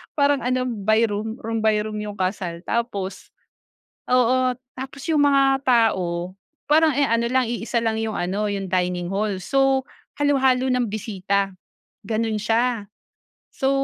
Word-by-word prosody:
parang 285 -1 +3
ano 255 +1 +1
by 220 0 +2
room 215 +2 -3
room 225 0 -2
by 220 -1 +4
room 215 0 -5
'yong 210 -1 -5
kasal. 185 -2 -2
Tapos 200 -5 -3 0.8
oo, 255 +1 +3 0.2
tapos 265 +1 -7
yung 300 -2 +4
mga 275 -1 +4
tao 185 -8 +2 0.4
parang 310 0 +5
e 285 - +3
ano 230 -1 +1
lang 260 0 +3
iisa 235 0 -1
lang 225 -1 0
'yong 220 -1 -2
ano 195 +4 -1
'yong 195 -1 -3
dining 180 -1 0
hall 205 +1 0
so 270 +4 +2 0.4
halo-halo 265 -3 +3
na'ng 250 -1 +1
bisita 200 -2 -1 0.6
gano'n 220 0 0
siya. 225 0 0 0.7
So 270 - 0
225 Hz, 145 wpm, -23 LUFS, 200-255 Hz, 0.8 s, parang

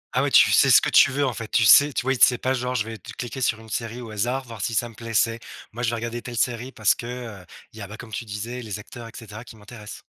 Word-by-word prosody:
Ah - - +3
ouais, - - 0
tu - - +6
sais - - +5
ce - - +8
que - - -2
tu - - +6
veux, 140 +2 0
en 130 - -1
fait, 115 -1 -7
tu 110 - +2
sais, 145 +8 +7
tu - - -2
vois, 135 +1 +1
i - - -3
c'est 125 - +6
pas 130 +2 -1
genre: 125 0 -3
«Je 110 -3 0
vais 115 -1 -8
t - - -11
cliquer 130 +2 -6
sur 115 -2 0
une 110 0 -14
série 115 +2 -4
au 115 -3 -9
hasard, 120 +6 -2
voir 115 -3 -9
si 110 +3 -2
ça 120 +3 0
me 115 - -14
plait». 115 +1 -8
C'est: 115 +2 +2 0.3
«Moi, 120 - -6
je 120 - +1
vais 120 - -2
regarder 120 +1 -5
telle 120 -2 -8
série 125 +1 -1
parce 110 -4 +2
que, 120 - -8
heu, 115 -7 -8 0.3
il 110 - -13
y - - -8
a, 100 - -7
bah- 105 - -10
comme 115 -2 -11
tu 120 - -4
disais- 115 +4 -6
les 110 -3 -6
acteurs 115 +3 -11
et - - -12
cetera 110 -1 -10
qui 120 - -14
m'intéressent». 105 0 -11
115 Hz, 325 wpm, -23 LUFS, 110-125 Hz, 0.3 s, ce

